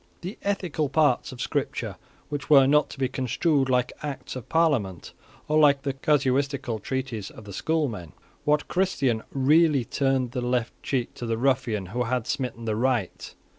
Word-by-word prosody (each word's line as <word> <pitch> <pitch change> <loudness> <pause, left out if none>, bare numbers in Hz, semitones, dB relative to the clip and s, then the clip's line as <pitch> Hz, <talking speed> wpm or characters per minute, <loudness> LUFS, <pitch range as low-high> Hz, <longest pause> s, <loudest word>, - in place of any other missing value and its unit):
The 185 +4 -7
ethical 180 -7 -1
parts 145 -3 +2
of 130 - -10
Scripture - - -2 0.5
were 140 -3 +8
not 150 +2 +3
to - - -10
be 135 -1 +1
construed 135 +3 0
like 125 -1 +2
Acts 135 -4 -5
of 130 - -8
Parliament, 135 - +1 0.3
or 155 +1 +3
like 140 -2 +5
the 140 -2 -1
casuistical 135 -4 0
treatises 125 -3 -4
of 110 - -13
the 100 - -9
schoolmen. 115 - -2 0.3
What 150 0 +1
Christian 140 -12 +1
really 145 0 +4
turned 135 -2 0
the 125 - -3
left 125 -1 -1
cheek 125 -4 -2
to 120 - -6
the 115 0 0
ruffian 120 -5 +1
who 125 0 0
had 125 -1 -1
smitten 125 -4 -3
the 110 -1 0
right? 120 -4 -1
130 Hz, 165 wpm, -26 LUFS, 120-150 Hz, 0.5 s, were